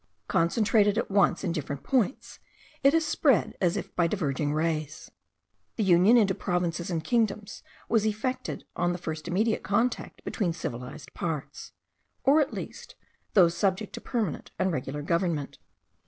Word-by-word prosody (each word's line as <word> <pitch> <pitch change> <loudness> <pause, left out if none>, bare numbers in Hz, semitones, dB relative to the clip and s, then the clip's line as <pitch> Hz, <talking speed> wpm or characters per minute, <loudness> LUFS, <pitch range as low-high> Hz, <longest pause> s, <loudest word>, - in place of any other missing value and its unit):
Concentrated 205 +4 +3
at - - -1
once 200 0 +3
in 180 - 0
different 140 -4 -4
points, 255 - -1 0.4
it 275 - +6
has 325 -1 +3
spread 285 -5 +2
as 175 -2 +2
if - - -6
by 170 -1 +3
diverging 150 -6 -1
rays. 155 -1 -2 0.6
The 220 - 0
union 190 +5 +6
into 200 -4 +4
provinces 175 -1 -2
and 165 -3 -2
kingdoms 215 -3 -1 0.3
was 225 -3 +2
effected 245 +4 -2
on 175 0 +1
the - - -3
first 160 -2 -5
immediate 215 +6 +1
contact 230 +5 -1
between 180 -7 -1
civilized 140 -2 -7
parts, 160 -5 -5 0.5
or 290 +3 +5
at 285 - 0
least - - -8 0.4
those 175 -4 +6
subject 195 +2 0
to - - -7
permanent 220 - -2
and 190 - +1
regular 145 0 -3
government. 170 -3 -1
180 Hz, 150 wpm, -28 LUFS, 165-215 Hz, 0.6 s, it